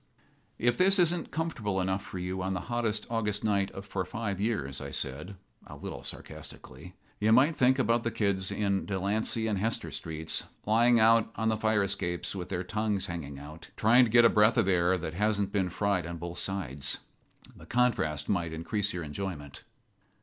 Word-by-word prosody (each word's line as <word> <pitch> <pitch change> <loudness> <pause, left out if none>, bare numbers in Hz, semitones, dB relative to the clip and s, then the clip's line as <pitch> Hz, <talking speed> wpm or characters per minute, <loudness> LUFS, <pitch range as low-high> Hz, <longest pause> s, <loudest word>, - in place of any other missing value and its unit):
"If 120 0 +1
this 195 +2 +5
isn't 175 -2 +2
comfortable 120 -12 -2
enough 95 +1 0
for 95 - -8
you 90 +1 -3
on 95 +1 -1
the 90 - -2
hottest 110 -3 0
August 105 -3 -1
night 100 -2 +1 0.2
for 100 -1 -2
five 100 +1 -4
years," 85 - -1
I - - -5
said, 75 +9 -5 0.3
a - - -9
little - - -7
sarcastically, - - -9 0.2
"you 110 +1 +3
might 135 +7 +5
think 130 0 +4
about 115 -2 +2
the 115 - -1
kids 100 -4 0
down - - -4
in 100 -2 0
Delancey 105 +3 0
and 105 -3 0
Hester 115 +3 -2
streets 80 0 -3 0.2
lying 115 +2 +4
out 115 0 +5
on 110 0 0
the 110 - +2
fire 110 -1 +2
escapes 90 -3 -2
with 90 -2 -5
their 90 -1 -2
tongues 105 +1 -1
hanging 75 -5 -6
out, 75 +3 -11
trying 120 +4 +6
to - - -3
get 120 +1 +6
a - - +10
breath 105 +2 +4
of 110 -5 +3
air 90 0 +3
that 80 -2 -5
hasn't 100 +1 0
been 95 -3 0
fried 95 -2 0
on 85 0 -5
both 85 +1 -5
sides. 75 -9 -2 0.6
The - - -14
contrast 120 - +1
might 85 -4 0
increase 100 +5 -2
your 90 -1 -4
enjoyment." 75 -2 -6
100 Hz, 185 wpm, -29 LUFS, 90-110 Hz, 0.6 s, a